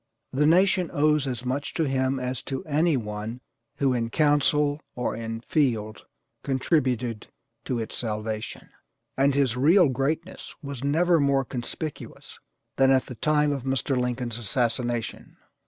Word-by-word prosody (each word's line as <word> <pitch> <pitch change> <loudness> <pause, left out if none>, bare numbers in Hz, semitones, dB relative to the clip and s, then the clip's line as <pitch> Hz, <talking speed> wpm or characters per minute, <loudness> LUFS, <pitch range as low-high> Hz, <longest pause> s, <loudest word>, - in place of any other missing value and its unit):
The 150 +3 +3
nation 180 +1 +4
owes 150 -1 +2
as 125 -1 -4
much 135 +3 -3
to 160 -3 +1
him 130 0 0
as 125 -1 -3
to 135 -1 -4
any 155 0 +2
one 105 +1 -5 0.4
who 135 -2 +1
in 115 -2 -1
council 145 +1 +2
or 125 - -2
in 115 0 -5
field 115 -7 -1 0.3
contributed 130 -5 0 0.4
to 125 - -1
its 110 -1 -4
salvation. 110 -1 -4 0.5
And 135 +1 +3
his 135 -4 +2
real 160 +6 +5
greatness 150 +7 -3
was 140 -3 -6
never 165 +4 +3
more 140 -1 +2
conspicuous 135 +5 -6 0.4
than 135 0 +5
at 130 -1 +4
the - - -8
time 150 +4 +2
of 140 -2 -2
Mr. 135 +1 0
Lincoln's 125 -2 -2
assassination. 120 +2 -2
135 Hz, 140 wpm, -26 LUFS, 120-145 Hz, 0.5 s, real